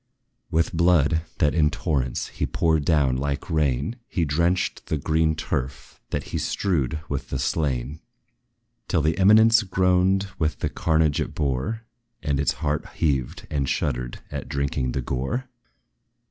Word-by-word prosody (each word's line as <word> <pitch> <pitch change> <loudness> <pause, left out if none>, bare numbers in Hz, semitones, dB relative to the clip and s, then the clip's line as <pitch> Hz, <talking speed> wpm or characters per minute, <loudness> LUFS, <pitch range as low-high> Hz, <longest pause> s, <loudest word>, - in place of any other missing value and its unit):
With 80 +1 +1
blood, 80 -2 +3 0.2
that, 75 - +2
in 75 -3 +3
torrents, 65 -4 -2
he - - -3
poured 80 -3 +1
down 70 -6 +3
like 70 +4 -3
rain, 75 - 0
He 85 -4 0
drenched 85 +5 0
the 80 - 0
green 80 +2 +1
turf, 65 -4 -4
that - - -2
he - - 0
strewed 75 -8 0
with 65 -3 -4
the 65 - -2
slain, 70 0 -1 0.9
Till 80 - +1
the 80 +1 +2
eminence 110 +3 +6
groaned 95 0 +2
with 80 -2 0
the - - -2
carnage 80 -2 +1
it - - -4
bore, 70 - -1 0.4
And 70 -3 0
its 70 - +2
heart 75 0 -1
heaved 70 -6 -1
and 70 -3 0
shuddered 60 0 -2
at - - -5
drinking 70 -2 -1
the 65 - -1
gore. 65 - -2
75 Hz, 145 wpm, -24 LUFS, 70-85 Hz, 0.9 s, eminence